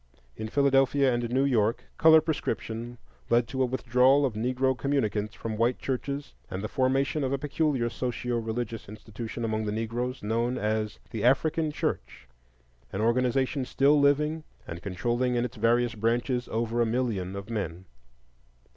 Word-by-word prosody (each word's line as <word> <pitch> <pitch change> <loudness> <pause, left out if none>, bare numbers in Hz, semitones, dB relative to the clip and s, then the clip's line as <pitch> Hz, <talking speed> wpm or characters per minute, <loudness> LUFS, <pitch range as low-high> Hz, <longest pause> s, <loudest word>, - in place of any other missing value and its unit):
In 110 - -5
Philadelphia 135 +1 +3
and 120 -1 -1
New 130 +3 +2
York 115 -4 +1 0.2
color 160 -1 +8
prescription 120 -6 -3 0.3
led 120 0 +3
to 130 +2 -2
a 130 - +3
withdrawal 130 +3 +3
of 130 - -1
Negro 130 +4 0
communicants 110 -6 -1
from 110 -1 -5
white 120 +2 +2
churches 140 +2 -4 0.2
and 95 +2 -5
the - - -1
formation 135 +4 +1
of 130 - -1
a 140 - +1
peculiar 145 -3 0
socio 120 0 -2
religious 115 -1 -4
institution 110 +2 -6
among 110 -1 -1
the 105 - -1
Negroes 115 +3 -3
known 115 +4 0
as 105 0 -1
the 110 -4 -4
African 155 +5 +2
Church,—an - - -7
organization 125 +4 +1
still 140 +3 +3
living 150 +3 +2 0.2
and 85 +1 -6
controlling 120 +7 -1
in 120 0 +1
its 125 0 -7
various 115 +2 +2
branches 120 +3 0
over 115 +1 -1
a - - +4
million 110 -6 -1
of 100 +3 -7
men. 95 -5 -4
120 Hz, 155 wpm, -28 LUFS, 110-135 Hz, 0.3 s, color